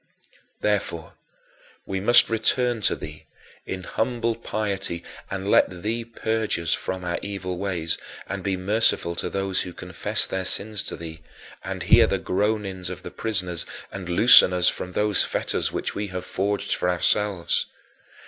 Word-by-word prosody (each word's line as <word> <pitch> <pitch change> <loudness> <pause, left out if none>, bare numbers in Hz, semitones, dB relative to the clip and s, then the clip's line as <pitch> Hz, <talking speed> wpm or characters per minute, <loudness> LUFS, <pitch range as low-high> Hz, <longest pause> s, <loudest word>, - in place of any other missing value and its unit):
Therefore, - - -1 0.7
we 95 - -2
must 120 +5 +6
return 115 +1 +2
to - - -1
thee 75 0 -9 0.4
in 95 -1 -4
humble 115 +4 -1
piety 100 -6 -3 0.3
and 100 +1 -3
let 90 -2 +3
thee 115 +2 -1
purge 110 -1 -1
us 85 -1 0
from 95 -1 -3
our 85 0 -1
evil 95 -3 -4
ways, 90 -5 -1 0.3
and 100 - -4
be 95 0 -1
merciful 100 -2 +1
to 85 - -2
those 95 -1 -1
who 90 - -6
confess - - -1
their 95 0 -3
sins 105 +2 0
to - - -4
thee, 80 -1 -9 0.4
and - - -4
hear - - +6
the - - 0
groanings 100 -2 -1
of 90 - -7
the - - -7
prisoners 90 -6 0 0.3
and 95 -2 -7
loosen 90 0 +7
us 90 0 +4
from 90 - -5
those 105 0 +2
fetters - - -1
which - - -3
we 105 +1 -3
have 90 -1 -5
forged 100 +1 -1
for 90 - 0
ourselves. 90 +1 +1
95 Hz, 160 wpm, -24 LUFS, 90-105 Hz, 0.7 s, loosen